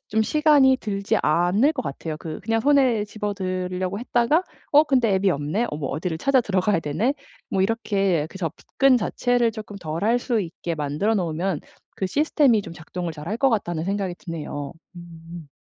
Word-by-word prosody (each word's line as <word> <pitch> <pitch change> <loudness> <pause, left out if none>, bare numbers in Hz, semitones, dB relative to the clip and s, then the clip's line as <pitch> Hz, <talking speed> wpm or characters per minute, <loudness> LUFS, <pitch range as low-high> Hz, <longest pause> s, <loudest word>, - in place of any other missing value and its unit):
좀 220 +1 +2
시간이 290 -1 +4
들지 200 -2 -1
않을 180 - +3
것 255 -4 -3
같아요. 155 +3 -5
그 155 0 -7
그냥 225 +1 0
손에 260 -6 +3
집어 210 -1 -4
들려고 185 0 -3
했다가 245 +7 +2 0.3
'어 295 +2 +7
근데 250 -8 +2
앱이 190 0 +2
없네? 150 +10 -1
어 - - -4
뭐 145 -3 -3
어디를 160 +3 -3
찾아 275 +4 +3
들어가야 195 -4 +1
되네?' 160 - 0 0.4
뭐 190 - 0
이렇게 195 -6 +1
그 190 - -11
접근 250 - +1
자체를 240 +3 +1
조금 210 -2 -8
덜 165 0 -4
할 235 +3 +3
수 235 -2 0
있게 170 -2 -4
만들어 150 +9 0
놓으면 175 -2 -1 0.4
그 190 - -1
시스템이 280 -3 +3
좀 170 - -9
작동을 170 +1 -6
잘할 160 +8 -5
것 270 +2 +3
같다는 175 -7 -1
생각이 195 -2 -2
드네요. 155 -6 -6 0.2
음. 165 -2 -11
195 Hz, 345 characters per minute, -23 LUFS, 170-235 Hz, 0.4 s, 어